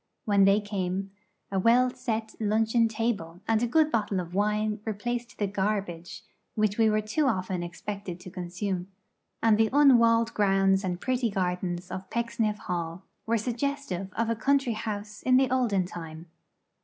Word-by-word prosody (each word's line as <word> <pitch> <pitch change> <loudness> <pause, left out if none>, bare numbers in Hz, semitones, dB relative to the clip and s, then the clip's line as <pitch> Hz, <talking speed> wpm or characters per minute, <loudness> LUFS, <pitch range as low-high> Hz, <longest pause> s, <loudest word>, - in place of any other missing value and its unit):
When 200 -2 +4
they 195 +1 +5
came, 195 -2 -3 0.4
a 195 - +1
well 245 +5 +4
set 220 -2 -3
luncheon 225 +2 +2
table 215 -7 -2
and 225 -1 +2
a 240 - +2
good 310 +5 +3
bottle 210 -4 0
of 175 -1 -6
wine 210 +2 0
replaced 235 +3 -4
the 205 - 0
garbage 195 -4 -3 0.3
which 215 -2 +1
we 220 -1 +5
were 215 0 +2
too 240 +8 0
often 185 -6 -1
expected 180 +1 -6
to 185 - -10
consume, 180 +1 -4 0.6
and 220 -1 +4
the 220 -1 +4
unwalled 235 -5 +5
grounds 195 -1 +3
and 180 -2 -2
pretty 250 0 0
gardens 180 -2 -2
of 185 +1 -6
Pecksniff 230 -2 -1
Hall 170 -1 -4 0.2
were 230 +1 +2
suggestive 235 -5 -3
of 230 0 -1
a 230 - 0
country 270 +1 +1
house 210 -1 -5
in 255 0 +4
the 260 -1 +2
olden 230 -8 +2
time. 165 -2 -8
210 Hz, 160 wpm, -27 LUFS, 185-230 Hz, 0.6 s, they